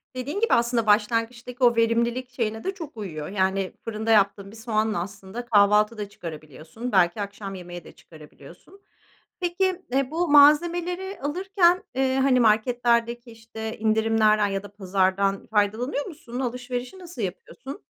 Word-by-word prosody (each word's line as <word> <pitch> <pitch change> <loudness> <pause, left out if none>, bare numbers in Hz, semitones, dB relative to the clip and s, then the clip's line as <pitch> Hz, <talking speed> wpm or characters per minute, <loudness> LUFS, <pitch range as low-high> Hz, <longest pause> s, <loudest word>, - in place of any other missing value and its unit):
Dediğin 275 +9 -4
gibi 460 - +2
aslında 235 -1 +1
başlangıçtaki 235 +4 0
o 240 -1 +5
verimlilik 235 +2 +1
şeyine 225 -3 -3
de 385 - -2
çok 320 - -9
uyuyor. 160 -8 -6
Yani, 190 -1 -1
fırında 225 0 -2
yaptığın 200 -1 +2
bir 220 - -13
soğanla 220 -3 -1
aslında 200 +5 -8
kahvaltı 210 0 +4
da 205 -1 -5
çıkarabiliyorsun. 160 - -8
Belki 185 +1 +3
akşam 200 -1 -6
yemeği 175 -2 -9
de - - -13
çıkarabiliyorsun. 165 - -16 0.6
Peki, 365 +1 0
eee, 270 +1 +1
bu 340 +2 -1
malzemeleri 345 +6 +4
alırken, 360 +4 +2
eee, 265 0 +1
hani, 265 -1 +3
marketlerdeki, 235 +1 +1
işte, 225 0 -8
indirimlerden 220 -1 +3
ya 195 0 -3
da 205 0 -12
pazardan 195 0 0
faydalanıyor 220 +7 0
musun? 265 -8 -8
Alışverişi 250 +4 -4
nasıl 345 - -8
yapıyorsun? 245 - -7
230 Hz, 140 wpm, -24 LUFS, 205-260 Hz, 0.6 s, o